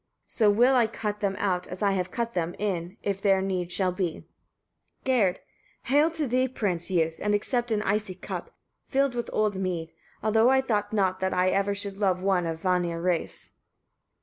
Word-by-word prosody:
So 215 -3 +3
will 240 +6 +5
I 240 -3 +4
cut 210 -2 -4
them 200 -2 0
out, 180 -3 -1
as 180 +3 -6
I 200 - +3
have 185 -1 -1
cut 235 +3 -3
them, 170 -1 -2
in, 190 -2 -3
if 195 -1 -2
there 195 -2 +4
need 185 -2 -2
shall 185 -1 +1
be. 180 -3 -3 0.8
Gerd. 230 -9 +3 0.5
37. 270 - 0
Hail 290 - +7
rather 325 +1 +1
to 310 -3 -1 0.6
thee, 190 - -5
youth! 160 -1 +1
and 210 0 +2
accept 240 +3 -1
an 215 -2 0
icy 205 -2 -1
cup, 185 - -6 0.4
filled 275 -1 +1
with 240 -1 -3
old 210 -2 +1
mead; 175 -4 -3 0.3
although 220 +2 +4
I 265 0 +4
thought 210 -5 -1
not 190 -3 +1
that 190 0 -1
I 185 +1 +3
ever 200 +1 +1
should 200 -1 -5
love 190 -3 +2
one 185 -2 +1
of 165 -1 -3
Vanir 175 -2 0
race. 175 -1 -2
195 Hz, 195 wpm, -27 LUFS, 180-220 Hz, 0.8 s, Hail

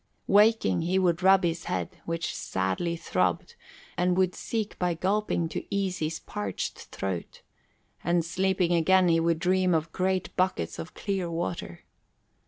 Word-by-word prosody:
Waking, 205 - +4
he 180 +3 +1
would 180 -2 +2
rub 190 0 +5
his 170 -1 -1
head, 90 -2 -3
which 165 0 -2
sadly 95 - -1
throbbed 90 - -1 0.4
and 180 0 +1
would 185 -1 +2
seek 220 -3 -4
by 180 -2 +1
gulping 190 -1 0
to - - -4
ease 195 -2 -1
his 160 +1 -2
parched 100 -2 -4
throat; 95 -3 -5 0.6
and 170 -1 +1
sleeping 185 0 +1
again, 180 +2 +4
he 165 0 +4
would 165 0 +2
dream 185 0 +2
of 160 0 -1
great 185 +1 -1
buckets 180 - 0
of 165 - -7
clear 195 -4 -2
water. 165 - -4
175 Hz, 150 wpm, -27 LUFS, 165-190 Hz, 0.6 s, rub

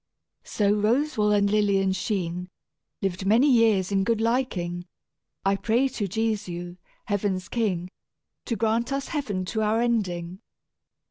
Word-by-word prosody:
"So 205 -1 +1
Roswal 215 +1 +1
and 200 -1 +3
Lilian 200 -2 +2
sheen, 180 -2 -2 0.5
Lived 190 -1 -1
many 230 +8 +5
years 225 -7 +3
in 195 -1 +2
good 230 +2 +1
liking. 200 -8 -1 0.6
I 195 0 +3
pray 235 +6 +1
to 215 -6 -3
Jesu, 185 -4 -3 0.3
heaven's 200 -4 -1
king, 185 -5 -1 0.6
To 235 - -1
grant 230 +2 0
us 275 0 -2
heaven 210 - -2
to 220 +4 -2
our 215 +1 +2
ending. 190 -7 -1
205 Hz, 130 wpm, -25 LUFS, 185-230 Hz, 0.6 s, many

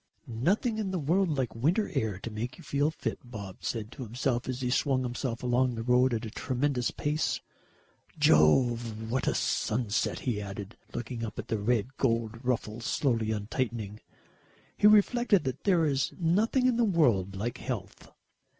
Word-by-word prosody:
"Nothing 195 - 0
in 205 -3 -1
the 185 - -1
world 165 +1 +1
like 130 -4 -1
winter 170 - +1
air 110 - -1
to 115 - -5
make 115 +4 -4
you - - -13
feel 145 +2 +1
fit," 160 - -4
Bob 105 -6 -8
said 110 -2 -3
to - - -10
himself 125 +1 -2
as 130 0 -3
he 125 -1 -1
swung 135 -1 +2
himself 120 -1 -3
along 125 0 +2
the 115 - -4
road 125 +2 +4
at 115 +1 -3
a 110 - -6
tremendous 130 +1 -1
pace. 150 +1 -1 0.8
"Jove, 110 - +3
what 130 +1 0
a - - +2
sunset!" 115 0 0
he 115 -5 -1
added, 100 +1 -7 0.2
looking 120 0 -5
up 110 -1 -5
at - - -6
the 110 - 0
red 120 +4 0
gold 115 -2 0
ruffles 115 -2 -2
slowly 115 -6 +1
untightening. 110 0 -3 0.8
He 210 - +5
reflected 215 0 +4
that 130 -1 -4
there 180 -5 +4
is 135 -2 0
nothing 210 +9 +2
in 250 -2 +3
the 240 - +3
world 120 - +2
like 120 +5 -3
health. 105 -7 -6
125 Hz, 170 wpm, -29 LUFS, 110-145 Hz, 0.8 s, He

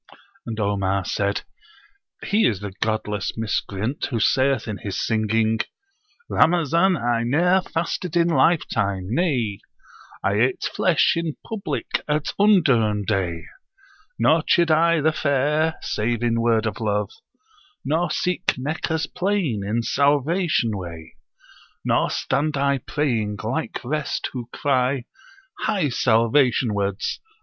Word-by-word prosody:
And 115 -1 -4
Omar 100 -2 0
said, 100 0 -1 0.8
"He 215 +2 +3
is 105 -5 -1
the 100 -2 -6
[godless] 110 -2 -2
miscreant 110 +3 -2
who 120 -5 -2
saith 130 0 +2
in 105 -2 -4
his 100 - -4
singing: 110 0 +1 0.7
'Ramazan 170 +2 +3
I 120 -2 0
ne'er 175 +10 +3
fasted 175 0 -3
in 170 0 +4
lifetime; 100 - +1
nay 125 - 0 0.6
I 100 +1 +1
ate 125 +1 +1
flesh 180 -4 +2
in 165 -2 -2
public 215 -4 -3
at 150 0 -1
undurn 130 - +3
day! 90 -5 -1 0.7
Nor - - +4
chid 170 -2 +3
I 165 +1 +4
the 160 +2 +3
fair, 150 +2 +1
save 115 +2 -1
in 115 -1 +1
word 115 -1 +2
of 110 -3 -3
love. 105 -2 -1 0.7
Nor 160 +5 +1
seek 180 +1 -1
Meccah's 160 +4 -2
plain 180 - -1
in 110 +4 -1
salvation 145 - +1
way: 85 -4 -8 0.7
Nor - - +2
stand 150 0 -1
I 140 0 +1
praying, 115 -7 -1
like 135 +9 -2
rest, 150 +3 -2
who 120 -2 -6
cry, 130 -2 0 0.6
"Hie 195 -9 0
salvation 120 0 +2
wards!" 100 -1 -2
125 Hz, 125 wpm, -23 LUFS, 110-160 Hz, 0.8 s, in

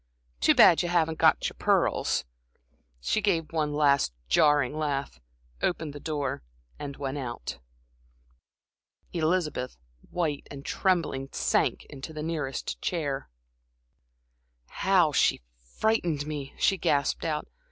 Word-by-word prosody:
Too - - +4
bad 165 - +7
you 175 - -2
haven't 160 -2 +1
got - - +4
your - - -8
pearls." - - +2 0.8
She 215 - +1
gave 165 -7 0
one 155 -2 0
last 140 - +3 0.2
jarring 145 - +4
laugh, 140 - -2 0.4
opened 160 -4 -1
the 145 - -8
door 145 -4 -3 0.4
and 140 -1 -6
went 140 0 -3
out. 120 - -5 1.5
Elizabeth, 155 -6 -1 0.3
white 155 -5 -2
and 140 0 -9
trembling, 165 -8 0
sank - - +1
into 140 +3 -9
the 155 -1 -5
nearest 150 -5 -3
chair. 145 -6 -2 1.4
"How 185 -5 +3
she 135 - +2 0.3
frightened 175 -10 +1
me!" 145 -3 -6
she 195 -2 +2
gasped 140 -2 +1
out. 155 -2 -1
150 Hz, 120 wpm, -28 LUFS, 140-165 Hz, 1.5 s, bad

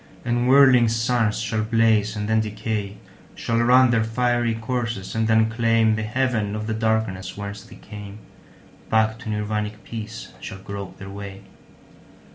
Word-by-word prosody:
And 120 +1 +1
whirling 130 -3 +6
suns 115 -1 +1
shall 110 -1 -1
blaze 110 -1 +2
and 105 0 -3
then 110 0 +3
decay, 105 -1 -4 0.4
Shall 115 0 -1
run 125 +1 +5
their 115 -2 +2
fiery 120 0 0
courses 115 -3 -3
and 110 0 0
then 110 0 +4
claimThe 115 -1 +2
haven 110 -3 0
of 110 0 -4
the 110 - -2
darkness 110 -4 -1
whence 100 0 -6
they - - -14
came; 105 -1 -10 0.7
Back 110 0 +2
to 120 - -7
Nirvanic 105 0 -3
peace 110 -1 -7
shall 95 - -7
grope 100 0 -8
their 95 0 -9
way. 100 -1 -8
110 Hz, 150 wpm, -23 LUFS, 105-115 Hz, 0.7 s, whirling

